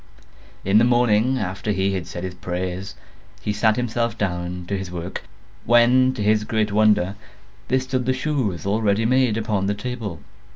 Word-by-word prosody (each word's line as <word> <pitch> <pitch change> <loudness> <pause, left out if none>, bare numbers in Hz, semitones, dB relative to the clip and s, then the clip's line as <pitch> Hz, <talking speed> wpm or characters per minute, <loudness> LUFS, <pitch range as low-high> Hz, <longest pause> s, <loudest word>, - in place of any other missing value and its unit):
In 100 +3 +5
the - - +4
morning 120 +1 +3
after 100 0 -3
he 95 0 0
had 95 -3 -3
said 85 - -6
his 95 -1 -4
prayers, 90 +2 -4 0.4
he 105 - -2
sat 110 +1 +2
himself 115 -1 -1
down 90 -3 -3
to 100 - -1
his 95 -1 -5
work; 90 +1 -5 0.4
when, 120 +2 +5
to 105 - -3
his 105 0 +3
great 110 -1 0
wonder, 105 -3 +3 0.5
there 130 +2 +2
stood 130 -1 -2
the - - +3
shoes 130 - -2
all 105 +3 0
ready 105 +1 +2
made, 125 -2 +3
upon 105 -3 -1
the 100 - 0
table. 105 -6 -5
105 Hz, 175 wpm, -22 LUFS, 95-120 Hz, 0.5 s, In